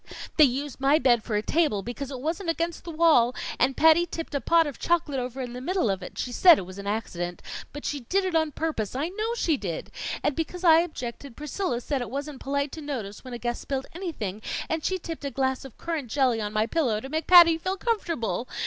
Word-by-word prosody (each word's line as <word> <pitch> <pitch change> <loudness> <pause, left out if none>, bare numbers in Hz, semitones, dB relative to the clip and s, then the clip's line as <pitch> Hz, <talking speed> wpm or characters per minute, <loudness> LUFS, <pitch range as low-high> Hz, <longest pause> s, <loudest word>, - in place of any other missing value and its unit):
"They 305 - +9
used 275 +2 -3
my 275 +3 +4
bed 240 -7 +3
for 220 - -3
a 210 - 0
table 295 -12 +1
because 250 +4 -5
it 265 -3 -6
wasn't 330 +6 -2
against 335 0 -2
the - - -6
wall, 310 -7 +4 0.2
and 260 +2 +2
Patty 320 +2 +5
tipped 330 -2 -6
a 280 - 0
pot 330 +6 +4
of 290 -4 -6
chocolate 320 -5 +1
over 250 +1 -4
in 245 -2 -5
the 250 - -6
middle 350 - +1
of 190 0 -3
it. 180 - -9
She 250 - -3
said 340 +5 +7
it 185 - -4
was 185 +2 -10
an 200 - -7
accident 175 -5 -3 0.3
but 290 - -8
she 290 - -2
did 375 +11 0
it 370 - -2
on 315 -2 +2
purpose 280 -9 -3
I 290 +6 -1
know 435 +5 -2
she 330 -10 +1
did! 180 -8 -5 0.3
And 290 - +1
because 350 +2 -4
I 325 -2 +7
objected, 270 -6 -5
Priscilla 300 -2 -2
said 275 +1 -2
it 245 - -4
wasn't 280 +2 -5
polite 280 +1 -1
to 320 - -7
notice 240 -9 -5
when 255 -2 -7
a - - -4
guest 240 0 -3
spilled 270 -1 -3
anything, 260 - -5 0.3
and 320 -1 -2
she 375 - 0
tipped 330 -3 -7
a 280 - -2
glass 265 0 -1
of 265 - -12
current 325 -6 -3
jelly 250 -3 +2
on 210 -1 -3
my 215 0 +1
pillow, 245 -6 0
to 265 - -7
make 310 +2 -3
Patty 340 -2 +8
feel 375 +3 -2
comfortable. 330 - -1
280 Hz, 240 wpm, -26 LUFS, 240-330 Hz, 0.3 s, They